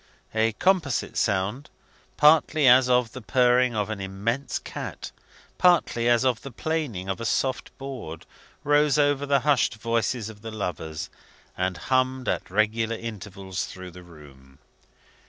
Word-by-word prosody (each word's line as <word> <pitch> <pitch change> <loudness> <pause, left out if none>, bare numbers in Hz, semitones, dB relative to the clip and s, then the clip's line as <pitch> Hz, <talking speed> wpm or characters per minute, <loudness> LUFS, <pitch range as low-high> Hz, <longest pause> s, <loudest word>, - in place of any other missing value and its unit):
A 110 0 +2
composite 170 - +1
sound, 105 +7 -1 0.5
partly 150 -1 +5
as 125 +1 +6
of 125 -2 +2
the 130 - -8
purring 125 +3 +3
of 105 0 -1
an 100 -2 -5
immense 105 +8 -2
cat, - - -7 0.5
partly 160 -9 +3
as 120 +2 +3
of 125 -4 +1
the 140 - -8
planing 130 - -3
of 95 +3 -3
a - - -3
soft 130 +3 -1
board, 130 - -7 0.4
rose 145 -1 +3
over 145 -1 +2
the 140 -1 +3
hushed 140 -5 +2
voices 115 0 -1
of 110 -2 -11
the 115 - -7
lovers, 80 -7 -5 0.4
and 90 -1 -1
hummed 130 +3 0
at - - -2
regular 110 +3 +1
intervals 100 -4 -6
through 95 -1 -9
the 90 +1 -12
room. 70 -6 -16
115 Hz, 145 wpm, -25 LUFS, 95-135 Hz, 0.5 s, as